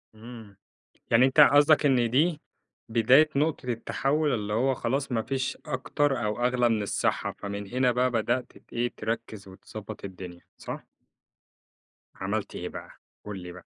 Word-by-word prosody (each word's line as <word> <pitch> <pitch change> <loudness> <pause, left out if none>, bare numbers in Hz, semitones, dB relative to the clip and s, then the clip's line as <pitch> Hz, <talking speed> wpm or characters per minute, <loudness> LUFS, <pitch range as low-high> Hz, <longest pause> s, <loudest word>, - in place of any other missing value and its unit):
إمم. 110 -3 -12 0.5
يعني 115 +3 +6
أنت 130 +3 +1
قصدك 145 +1 +6
إن 125 -4 +3
دي 155 +5 +2 0.5
بداية 125 +7 +5
نُقطة 150 -1 0
التحوّل 135 +5 0
اللي 105 -3 -2
هو 130 +4 +2
خلاص 135 +3 -2
ما 115 - +1
فيش 130 +2 -3
أكتر 130 -1 -1
أو 105 +3 -1
أغلى 125 -1 +2
من 110 -2 +1
الصحّة. 100 - -1
فمن 100 0 -5
هنا 125 +2 +2
بقى 125 +1 +1
بدأت 120 +2 -1
ت - - -21
إيه، 120 +1 -1
تركّز، 110 -2 -4
وتضبّط 100 +2 -9
الدنيا 90 -2 -9 0.2
صح؟ - - -7 1.3
عملت - - -3
إيه - - -5
بقي؟ - - -9 0.4
قُل 105 -2 -6
لي 90 - -8
بقى، 90 0 -13
120 Hz, 150 wpm, -27 LUFS, 110-135 Hz, 1.3 s, يعني